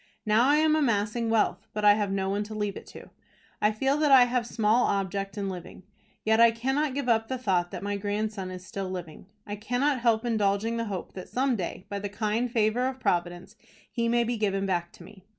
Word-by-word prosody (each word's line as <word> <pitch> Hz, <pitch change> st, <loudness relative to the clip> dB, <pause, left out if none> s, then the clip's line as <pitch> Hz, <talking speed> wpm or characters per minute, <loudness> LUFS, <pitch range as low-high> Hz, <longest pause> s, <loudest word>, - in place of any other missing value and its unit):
Now 220 Hz, +5 st, +4 dB
I 290 Hz, -, +5 dB
am 310 Hz, 0 st, +3 dB
amassing 230 Hz, -4 st, 0 dB
wealth 215 Hz, -3 st, +1 dB
but 210 Hz, 0 st, -1 dB
I 205 Hz, -, +8 dB
have 205 Hz, -2 st, -1 dB
no 195 Hz, -1 st, -1 dB
one 200 Hz, +1 st, -1 dB
to 215 Hz, +1 st, -8 dB
leave 205 Hz, -2 st, -2 dB
it -, -, -10 dB
to. -, -, -12 dB, 0.5 s
I 210 Hz, -, +4 dB
feel 270 Hz, +6 st, 0 dB
that 300 Hz, -1 st, +2 dB
I 260 Hz, -2 st, +9 dB
have 245 Hz, -1 st, 0 dB
small 225 Hz, +1 st, +2 dB
object 195 Hz, 0 st, -2 dB
in 200 Hz, -1 st, -2 dB
living. 185 Hz, -1 st, -8 dB, 0.4 s
Yet 220 Hz, +1 st, +3 dB
I 235 Hz, -, +8 dB
cannot 265 Hz, +5 st, -1 dB
give 280 Hz, -2 st, -2 dB
up 225 Hz, -2 st, +2 dB
the 260 Hz, -, -3 dB
thought 185 Hz, -7 st, 0 dB
that -, -, -7 dB
my 205 Hz, 0 st, -2 dB
grandson 205 Hz, -1 st, -3 dB
is 185 Hz, 0 st, -8 dB
still 195 Hz, -2 st, -5 dB
living. 180 Hz, -2 st, -7 dB, 0.2 s
I 205 Hz, -, -5 dB
cannot 250 Hz, +6 st, 0 dB
help 230 Hz, -1 st, +2 dB
indulging 220 Hz, 0 st, 0 dB
the 230 Hz, -, -2 dB
hope 195 Hz, -5 st, -5 dB
that 185 Hz, -, -9 dB
some 260 Hz, 0 st, +1 dB
day, 185 Hz, -2 st, -5 dB
by 200 Hz, -1 st, -4 dB
the 205 Hz, 0 st, -4 dB
kind 220 Hz, +3 st, -1 dB
favor 230 Hz, +2 st, +1 dB
of 260 Hz, 0 st, -5 dB
Providence, 175 Hz, -1 st, -2 dB, 0.4 s
he 235 Hz, -1 st, -1 dB
may 235 Hz, 0 st, +3 dB
be 235 Hz, 0 st, -2 dB
given 195 Hz, -2 st, 0 dB
back 175 Hz, -2 st, -1 dB
to -, -, -14 dB
me. 195 Hz, -3 st, -15 dB
215 Hz, 225 wpm, -27 LUFS, 195-240 Hz, 0.5 s, I